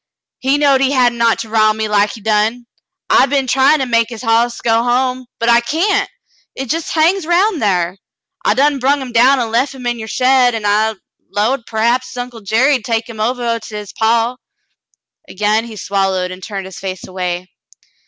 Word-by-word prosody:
He 270 Hz, +2 st, +1 dB
knowed 280 Hz, -2 st, +3 dB
he 270 Hz, -, +3 dB
hadn't 240 Hz, -3 st, +2 dB
ought 230 Hz, -1 st, +3 dB
to 225 Hz, -, -8 dB
rile 215 Hz, -1 st, +3 dB
me 220 Hz, 0 st, -2 dB
like 210 Hz, 0 st, +1 dB
he 225 Hz, -, -11 dB
done. 220 Hz, +3 st, 0 dB, 0.4 s
I 265 Hz, -, +4 dB
be'n 275 Hz, -1 st, 0 dB
tryin' 270 Hz, +4 st, +3 dB
to -, -, 0 dB
make 230 Hz, -2 st, +1 dB
his 230 Hz, 0 st, -8 dB
hoss 235 Hz, +1 st, +1 dB
go 225 Hz, 0 st, +2 dB
home, 250 Hz, +1 st, 0 dB
but 230 Hz, -, -2 dB
I 235 Hz, 0 st, +5 dB
cyan't. 330 Hz, -, 0 dB, 0.5 s
Hit 270 Hz, +1 st, -2 dB
jes' 330 Hz, -1 st, -4 dB
hangs 330 Hz, +2 st, +1 dB
round 360 Hz, +1 st, +2 dB
thar. 180 Hz, -4 st, 0 dB, 0.5 s
I -, -, +2 dB
done 280 Hz, +1 st, +2 dB
brung 275 Hz, +3 st, +2 dB
him 260 Hz, -2 st, -7 dB
down 250 Hz, +4 st, +4 dB
an' 230 Hz, -2 st, -2 dB
lef 260 Hz, +4 st, 0 dB
him 255 Hz, -2 st, -10 dB
in 240 Hz, -1 st, -1 dB
your 220 Hz, -, -6 dB
shed, 255 Hz, 0 st, +3 dB
an' 220 Hz, -2 st, -4 dB
I 215 Hz, +2 st, +2 dB, 0.3 s
'lowed 230 Hz, +4 st, -1 dB
p'rhaps 235 Hz, +3 st, -1 dB
Uncle 245 Hz, -2 st, -6 dB
Jerry'd 245 Hz, +5 st, +2 dB
take 225 Hz, 0 st, -2 dB
him 230 Hz, -2 st, -10 dB
ovah 235 Hz, +1 st, -1 dB
to 215 Hz, -1 st, -10 dB
his 210 Hz, -2 st, -7 dB
paw." 230 Hz, +2 st, +1 dB, 0.9 s
Again 215 Hz, +3 st, 0 dB
he 230 Hz, -2 st, -9 dB
swallowed 195 Hz, -2 st, -1 dB
and 185 Hz, +1 st, -9 dB
turned 195 Hz, -1 st, -6 dB
his 190 Hz, -2 st, -10 dB
face 190 Hz, -1 st, -6 dB
away. 180 Hz, -1 st, -4 dB
235 Hz, 195 wpm, -16 LUFS, 215-260 Hz, 0.9 s, I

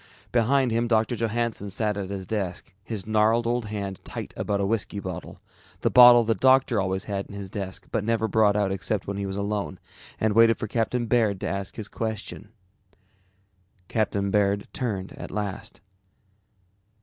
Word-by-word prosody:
Behind 125 Hz, +2 st, +2 dB
him 115 Hz, +1 st, +1 dB
Doctor 115 Hz, +1 st, +2 dB
Johannsen 115 Hz, -2 st, -2 dB
sat 105 Hz, +2 st, -1 dB
at 100 Hz, -2 st, -4 dB
his 95 Hz, -1 st, -5 dB
desk, 95 Hz, -4 st, -4 dB
his 110 Hz, -3 st, -5 dB
gnarled 110 Hz, +2 st, +2 dB
old 120 Hz, 0 st, 0 dB
hand 100 Hz, -2 st, -5 dB
tight -, -, -6 dB
about 100 Hz, -1 st, -1 dB
a 100 Hz, -, +1 dB
whiskey 100 Hz, -1 st, -1 dB
bottle, 90 Hz, -2 st, -7 dB, 0.4 s
the -, -, +1 dB
bottle 120 Hz, -1 st, +9 dB
the 115 Hz, 0 st, +2 dB
doctor 130 Hz, 0 st, +4 dB
always 95 Hz, 0 st, -1 dB
had 100 Hz, -2 st, -4 dB
in 100 Hz, -, -10 dB
his 100 Hz, -2 st, -7 dB
desk 95 Hz, -3 st, -5 dB
but 105 Hz, -, 0 dB
never 110 Hz, 0 st, +1 dB
brought 105 Hz, -1 st, +3 dB
out 100 Hz, -2 st, +1 dB
except 95 Hz, +2 st, -2 dB
when 100 Hz, 0 st, -4 dB
he 100 Hz, 0 st, -2 dB
was 95 Hz, 0 st, -4 dB
alone, 100 Hz, -2 st, -2 dB, 0.4 s
and 110 Hz, -1 st, +1 dB
waited 115 Hz, +1 st, +5 dB
for -, -, -3 dB
Captain 120 Hz, +2 st, -1 dB
Baird 110 Hz, -4 st, +2 dB
to -, -, -2 dB
ask 100 Hz, +3 st, -4 dB
his 110 Hz, -3 st, -5 dB
question. 110 Hz, -2 st, -5 dB, 1.4 s
Captain 100 Hz, -3 st, 0 dB
Baird 100 Hz, -1 st, +1 dB
turned 100 Hz, -7 st, -3 dB
at -, -, -7 dB
last. 105 Hz, 0 st, -5 dB
105 Hz, 175 wpm, -25 LUFS, 100-115 Hz, 1.4 s, bottle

